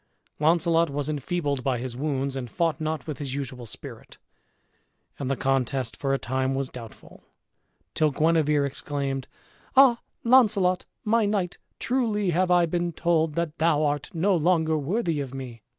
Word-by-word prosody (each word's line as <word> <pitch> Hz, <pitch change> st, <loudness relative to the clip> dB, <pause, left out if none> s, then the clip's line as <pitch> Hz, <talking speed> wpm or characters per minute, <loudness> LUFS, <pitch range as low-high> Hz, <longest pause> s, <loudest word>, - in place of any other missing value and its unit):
Launcelot 165 Hz, +1 st, +3 dB
was 145 Hz, +1 st, -3 dB
enfeebled 145 Hz, -2 st, -2 dB
by 130 Hz, -2 st, 0 dB
his 120 Hz, 0 st, -5 dB
wounds, 135 Hz, -1 st, -2 dB
and 125 Hz, -3 st, -4 dB
fought 165 Hz, +2 st, -1 dB
not 155 Hz, -3 st, -2 dB
with 155 Hz, -2 st, -5 dB
his 135 Hz, -2 st, -4 dB
usual 130 Hz, -4 st, -5 dB
spirit, 110 Hz, -, -9 dB, 1.0 s
and 135 Hz, -, -3 dB
the 135 Hz, -, +1 dB
contest 130 Hz, -2 st, -1 dB
for 135 Hz, -, -2 dB
a 135 Hz, -, +2 dB
time 130 Hz, +1 st, -1 dB
was 135 Hz, -1 st, -2 dB
doubtful; 115 Hz, -3 st, -12 dB, 0.7 s
till 155 Hz, -1 st, +2 dB
Guenever 150 Hz, -1 st, +2 dB
exclaimed, 140 Hz, -1 st, -3 dB, 0.5 s
"Ah, 260 Hz, -3 st, +6 dB, 0.2 s
Launcelot! 205 Hz, -7 st, +4 dB, 0.2 s
my 220 Hz, 0 st, +2 dB
knight, 195 Hz, -4 st, -1 dB, 0.2 s
truly 220 Hz, -7 st, 0 dB
have 180 Hz, +2 st, +1 dB
I 175 Hz, -1 st, +5 dB
been 175 Hz, +1 st, -2 dB
told 160 Hz, -2 st, +1 dB
that 170 Hz, -2 st, -2 dB
thou 160 Hz, -2 st, +3 dB
art 145 Hz, -1 st, -1 dB
no 185 Hz, +4 st, +2 dB
longer 160 Hz, -1 st, +2 dB
worthy 165 Hz, +2 st, -1 dB
of 135 Hz, -1 st, -6 dB
me!" 125 Hz, -4 st, -7 dB
155 Hz, 155 wpm, -26 LUFS, 135-175 Hz, 1.0 s, Ah